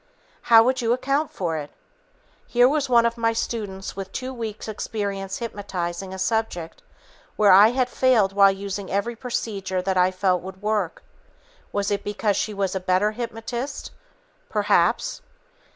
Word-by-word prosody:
How 225 -1 +9
would 255 +2 +1
you 230 0 +2
account 275 +4 0
for 165 -4 -3
it? 145 -1 -6 0.8
Here 245 +1 +5
was 285 0 0
one 235 -1 +5
of 235 0 -1
my 230 0 +2
students 205 -4 -4
with 195 -1 -6
two 260 +4 -5
weeks' 225 -3 -6
experience 200 -3 -4
hypnotizing 190 -5 -4
a 190 - -6
subject 190 -5 -2 0.5
where 210 -2 +5
I 200 +3 +9
had 250 +2 +1
failed 245 -6 +2
while 200 0 +6
using 195 0 -5
every 215 +4 -1
procedure 205 -6 -3
that 190 0 0
I 180 0 +4
felt 185 -1 +1
would 190 +1 -9
work. 210 -4 -2 0.7
Was 200 0 -1
it 200 -1 -1
because 205 0 -1
she 215 - -1
was 195 -2 -2
a 190 - -1
better 185 +3 +1
hypnotist? 235 +4 -5 0.6
Perhaps! - - +1
205 Hz, 155 wpm, -24 LUFS, 190-235 Hz, 0.8 s, How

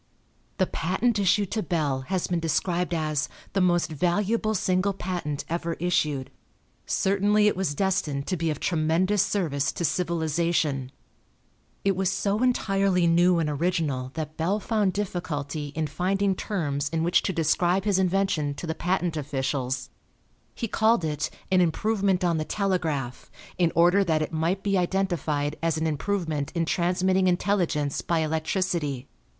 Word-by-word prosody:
The 185 - +3
patent 205 +7 0
issued 200 0 +2
to 220 - 0
Bell 150 -8 -1
has 185 -2 0
been 175 -1 -1
described 170 +3 0
as 155 -3 -1 0.2
"the 195 - +2
most 175 -3 +2
valuable 205 +7 0
single 185 +1 +1
patent 175 -6 -4
ever 170 0 -2
issued." 150 -6 -1 0.6
Certainly 205 +2 +2
it - - +2
was 180 -6 -1
destined 150 -7 0
to 185 - -1
be 165 -1 -1
of 150 -2 -2
tremendous 175 +4 +1
service 155 -9 0
to 170 - -2
civilization. 160 -5 0 0.9
It 195 -1 +3
was 190 0 +1
so 200 +2 0
entirely 195 -7 +2
new 175 +1 +4
and 165 -2 +1
original 150 -4 -1
that 155 -1 -5
Bell 185 +6 0
found 210 -3 0
difficulty 155 -7 -3
in 160 0 0
finding 190 +6 0
terms 145 -8 -2
in 165 +1 -1
which 175 +1 +3
to - - -1
describe 175 +3 +1
his 200 -2 +2
invention 185 -6 +1
to 175 - -6
the 160 - -2
patent 175 0 -1
officials. 135 -3 -2 0.6
He 230 - -3
called 220 -4 +2
it 150 -1 -2 0.2
"an 185 -1 +5
improvement 195 +2 +1
on 170 -2 +2
the - - 0
telegraph," 160 -10 -2 0.3
in 170 -2 +3
order 175 +4 +5
that 160 -4 +1
it 155 - -6
might 170 +5 0
be 195 -2 +2
identified 170 -6 -1
as 165 -1 0
an 160 - -1
improvement 160 -2 -1
in 165 -1 +1
transmitting 185 +2 +1
intelligence 175 -6 0
by 170 -2 0
electricity. 155 -3 -1
175 Hz, 150 wpm, -26 LUFS, 155-190 Hz, 0.9 s, an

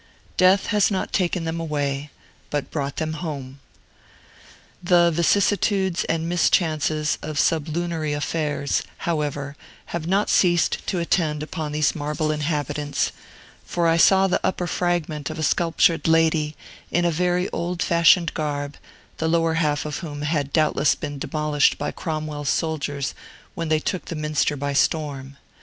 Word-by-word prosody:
Death 185 +1 +4
has 210 -1 +4
not 195 -3 -2
taken 180 -2 0
them 165 0 -3
away, 145 -3 -2 0.4
but 145 -1 -3
brought 140 -2 -3
them 160 -1 -2
home. 140 -5 -6 1.2
The 175 -1 +4
vicissitudes 190 +2 +2
and 165 0 -1
mischances 155 -3 +1
of 155 -1 -5
sublunary 160 0 0
affairs, 145 -1 -1 0.2
however, 145 -4 -2 0.4
have 170 -1 -3
not 195 +3 +2
ceased 175 -2 +3
to 190 - -1
attend 160 -3 0
upon 155 -1 -4
these 150 -1 +1
marble 150 0 -2
inhabitants; 150 -1 -1 0.5
for 175 -1 -1
I 165 0 +3
saw 190 +3 +6
the 190 - +1
upper 180 -1 0
fragment 170 -4 -1
of 155 - -6
a 160 - -3
sculptured 165 +2 +2
lady, 160 -2 +2 0.3
in 175 0 +1
a 170 - +3
very 180 +2 +1
old 175 +1 -2
fashioned 170 0 +4
garb, 145 -2 -3 0.4
the 160 - 0
lower 165 0 +2
half 155 -2 0
of 150 -1 -3
whom 145 -3 -6
had 145 -2 -1
doubtless 155 -2 +2
been 145 -2 -6
demolished 150 -1 +1
by 145 - -3
Cromwell's 155 -3 -4
soldiers 145 -4 -1 0.4
when 165 -1 -4
they 155 0 +3
took 185 +3 -3
the 170 - -5
Minster 150 -1 0
by 140 +1 -2
storm. 140 -2 -1
155 Hz, 145 wpm, -23 LUFS, 150-170 Hz, 1.2 s, saw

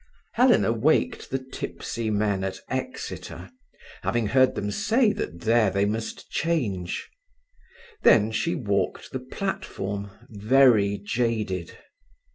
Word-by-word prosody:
Helena 245 - +4
waked 130 +8 +1
the 135 - 0
tipsy 130 -3 -5
men 105 -2 0
at 95 -1 -3
Exeter, 195 - -5 0.5
having 120 -2 0
heard 130 +5 +3
them 105 0 -2
say 220 - +2
that 85 -1 -5
there 115 0 +3
they 100 +1 +1
must 110 +2 -4
change. 105 - -1 0.9
Then 110 -1 +5
she 170 +9 0
walked 100 -10 -1
the 130 - -3
platform, 100 - -4 0.2
very 110 -2 +4
jaded. 105 -4 -2
110 Hz, 110 wpm, -25 LUFS, 100-130 Hz, 0.9 s, Then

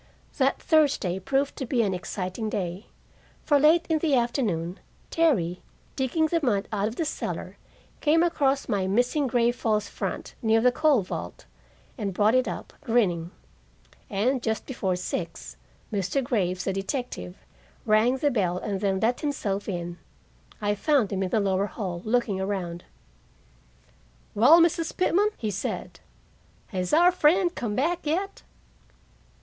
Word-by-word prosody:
That - - +2
Thursday 285 - +2
proved 270 +8 0
to 265 - -3
be 240 -1 +2
an 195 -3 0
exciting 185 +3 -4
day. 185 0 -4 0.6
For 290 -2 +3
late 320 +4 +5
in 320 -1 +1
the 300 -3 +2
afternoon 215 - -1 0.3
Terry, 205 - +1 0.3
digging 275 +4 +1
the 335 +2 +1
mud 215 -8 0
out 205 -1 0
of 225 - -5
the 330 - -1
cellar, 310 - -4 0.4
came 320 +2 +3
across 280 -5 +1
my 195 -2 0
missing 245 +8 +1
gray 240 -1 +2
false 215 -3 -1
front - - -5
near 225 -1 +3
the 250 +2 +4
coal 290 -4 +3
vault, 90 - -7 0.5
and 200 -3 -3
brought 210 +3 +3
it 255 0 +3
up, - - -6
grinning. 190 - +1 0.8
And 245 +6 0
just 220 -1 -2
before 195 -8 -2
six, 170 -1 -5 0.4
Mr. 205 +7 0
Graves, 185 -8 -1
the 195 - -1
detective, 195 - -4 0.5
rang 220 +5 +3
the 290 +2 +1
bell 185 -7 0
and 195 +1 -3
then 195 -2 +1
let 240 +3 +1
himself 210 -9 -2
in. 175 -2 -4 0.6
I 205 -1 0
found 255 0 +1
him 190 - -1
in 190 - -1
the 220 - +2
lower 195 0 +1
hall, 185 -6 -5
looking 220 -4 0
around. 185 -3 -3 1.5
"Well, 275 +11 +7
Mrs. 330 0 +1
Pitman," 385 +3 +3
he 215 -2 -2
said, 195 - -4 0.7
"has 185 -3 -3
our 345 +4 +6
friend 350 +2 +3
come 230 -9 -3
back 330 +5 0
yet?" 380 +6 -2
225 Hz, 150 wpm, -26 LUFS, 190-285 Hz, 1.5 s, Well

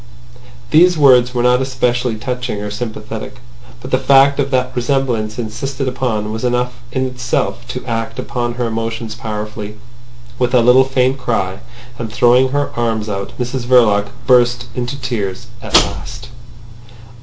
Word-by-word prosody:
These 175 +2 +5
words 125 -4 +5
were 120 - +1
not 125 +1 +4
especially 125 -2 0
touching 125 -1 -4
or 105 0 -5
sympathetic. 110 +1 -6 0.5
But - - -8
the 130 - +3
fact 135 +1 +5
of 140 -1 +1
that 130 -1 0
resemblance 120 -4 -1
insisted 130 +4 -4
upon 115 -5 -2
was 110 +2 -5
enough 125 0 0 0.2
in 130 +1 -1
itself 125 -1 -2
to 125 - -6
act 115 -1 -3
upon 125 -2 -3
her 120 0 -1
emotions 115 0 -3
powerfully. 105 -1 -6 0.6
With 125 0 +1
a 125 - +6
little 125 +2 +6
faint 130 0 +1
cry, 95 -7 -2 0.4
and 115 -2 -4
throwing 125 +3 +4
her 145 +2 -1
arms 110 -2 -1
out, 100 -1 -4
Mrs 125 0 -3
Verloc 110 -5 +4 0.2
burst 120 -1 +3
into 125 +3 -4
tears 110 -7 -3 0.2
at - - -3
last. 120 +1 +1
120 Hz, 150 wpm, -17 LUFS, 110-130 Hz, 0.6 s, a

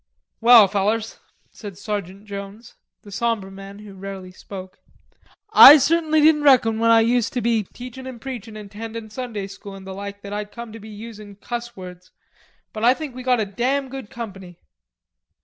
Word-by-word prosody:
"Well, 230 -3 +8
fellers," 210 +3 -1 0.3
said 200 -4 -10
Sergeant 200 -1 -5
Jones, 200 +3 -9 0.3
the 205 - -13
sombre 215 -2 -2
man 195 +1 -11
who 210 -1 -12
rarely 190 -1 -8
spoke, 185 0 -10 0.7
"I 295 - +11
certainly 315 +2 +2
didn't 305 0 +5
reckon 245 -6 +4
when 230 0 +2
I 230 0 +6
used 235 0 +1
to 250 - -1
be 230 -1 +1
teachin' 255 +1 -9
and 255 -3 -8
preachin' 230 -4 -7
and 205 -2 -10
tendin' 225 0 -8
Sunday 225 -4 -5
School 195 0 -10
and 190 -1 -12
the 190 - -7
like 200 +1 -8
that 200 0 -7
I'd 210 0 -5
come 235 -2 -9
to 225 - -9
be 220 +1 -12
usin' 210 -1 -10
cuss 240 +3 -6
words, 180 -1 -11 0.6
but 215 - -6
I 245 +2 +5
think 305 -4 -7
we 255 - -8
got 250 -1 +1
a - - 0
damn 260 +7 -1
good 265 -4 -8
company." 195 -6 -9
220 Hz, 185 wpm, -22 LUFS, 200-240 Hz, 0.7 s, I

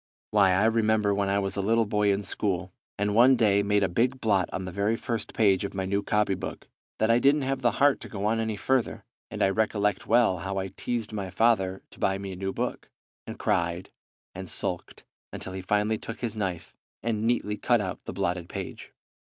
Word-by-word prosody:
"Why, 100 -3 +5
I 100 +4 +3
remember 110 -2 +2
when 100 0 0
I 100 - +2
was 100 -1 -1
a 100 - -1
little 115 +3 +2
boy 105 0 +2
in 100 +1 -1
school, 95 -3 -2 0.2
and 105 +1 0
one 125 +4 +6
day 105 -4 +3
made 100 0 +2
a - - +3
big 125 +9 0
blot 100 -6 +1
on 95 - -4
the 95 - -5
very 100 +4 0
first 115 0 -4
page 100 -4 +3
of 100 - -5
my 95 -1 -2
new 100 +2 0
copybook, 100 -2 -1 0.3
that 110 +1 +2
I 115 - +4
didn't 140 +2 +3
have 135 0 -1
the 120 -2 +2
heart 145 0 +3
to - - -8
go 100 -3 -4
on 110 +1 +1
any 110 -1 -1
further, 130 +3 -1 0.2
and - - -2
I 95 - +4
recollect 105 -1 0
well 115 -6 +3
how 95 +3 -4
I 95 0 -2
teased 115 +1 -4
my 100 -3 -3
father 95 -2 +1
to - - -16
buy 95 0 +1
me 100 0 -6
a - - -6
new 95 +1 -3
book, - - -4 0.4
and - - -7
cried 85 +1 -1 0.4
and 95 -1 -7
sulked - - -3 0.3
until 95 - -6
he 95 - -5
finally 105 +3 0
took 115 - -8
his 115 -3 -2
knife 95 -5 -4 0.3
and 110 -2 -1
neatly 115 -2 0
cut 120 +3 +2
out 95 -2 -4
the - - -5
blotted 90 -2 -2
page. - - -7
105 Hz, 220 wpm, -27 LUFS, 95-115 Hz, 0.4 s, one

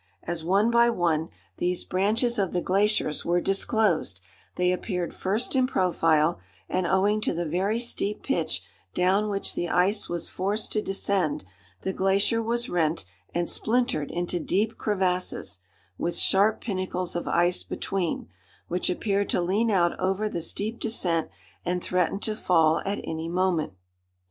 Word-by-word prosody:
As, 170 -1 -4
one 200 +7 +3
by 235 0 +5
one, 165 -7 0 0.3
these 180 0 0
branches 220 +5 +1
of 190 -3 0
the 180 - 0
glaciers 195 -5 +1
were 175 +1 +2
disclosed, 195 - +1 0.4
they 180 0 +2
appeared 180 -1 -2
first 210 +8 0
in 260 -1 +3
profile, 165 - +2 0.3
and 185 -1 -1
owing 205 +3 +2
to - - -1
the 175 +1 -2
very 190 +8 0
steep 210 -3 -1
pitch - - -1 0.3
down 195 +4 +2
which 200 -1 -2
the 175 - -2
ice 200 +4 +2
was 175 -1 -2
forced 205 +4 -1
to 215 - +1
descend, 195 - 0 0.4
the 190 - -2
glacier 195 +5 +2
was 235 +2 0
rent 165 -2 0 0.3
and 175 0 0
splintered 230 - +1
into 175 0 -2
deep 210 +7 0
crevasses, 185 - 0 0.4
with 170 - -1
sharp 205 +3 +3
pinnacles 185 -4 -3
of 175 - -3
ice 175 +1 +3
between, 185 - -3 0.4
which 180 +1 0
appeared 200 +2 0
to - - +1
lean 200 +6 +1
out 175 -4 +3
over 190 +3 0
the 175 -5 -3
steep 215 +7 -2
descent 175 -8 +1 0.3
and 180 0 -2
threaten 180 +1 0
to 215 - -1
fall 160 -6 +3
at 200 +1 -1
any 160 +1 -4
moment. 175 - 0
185 Hz, 155 wpm, -26 LUFS, 175-210 Hz, 0.4 s, by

